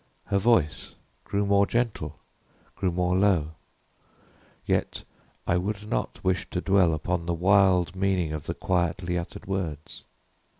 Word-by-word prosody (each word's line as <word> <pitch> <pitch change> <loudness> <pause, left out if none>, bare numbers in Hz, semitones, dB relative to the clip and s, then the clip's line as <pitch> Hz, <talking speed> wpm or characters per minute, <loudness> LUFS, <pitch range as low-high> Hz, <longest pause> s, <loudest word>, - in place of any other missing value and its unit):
Her 100 -1 +1
voice 100 -8 +1 0.3
grew 100 0 0
more 100 0 +4
gentle 110 - -2 0.6
grew 95 -3 0
more 90 +1 +1
low 95 -6 +2 1.1
yet - - -1 0.4
I 85 - +2
would 105 +3 -3
not - - -3
wish 95 0 0
to 90 - -2
dwell 90 -3 +3
upon 85 +2 -2
the 85 - 0
wild 95 0 +3
meaning 95 -4 0
of 75 -2 -6
the - - -2
quietly 90 0 -1
uttered 85 -1 -5
words. 85 -6 -4
90 Hz, 135 wpm, -26 LUFS, 85-100 Hz, 1.1 s, more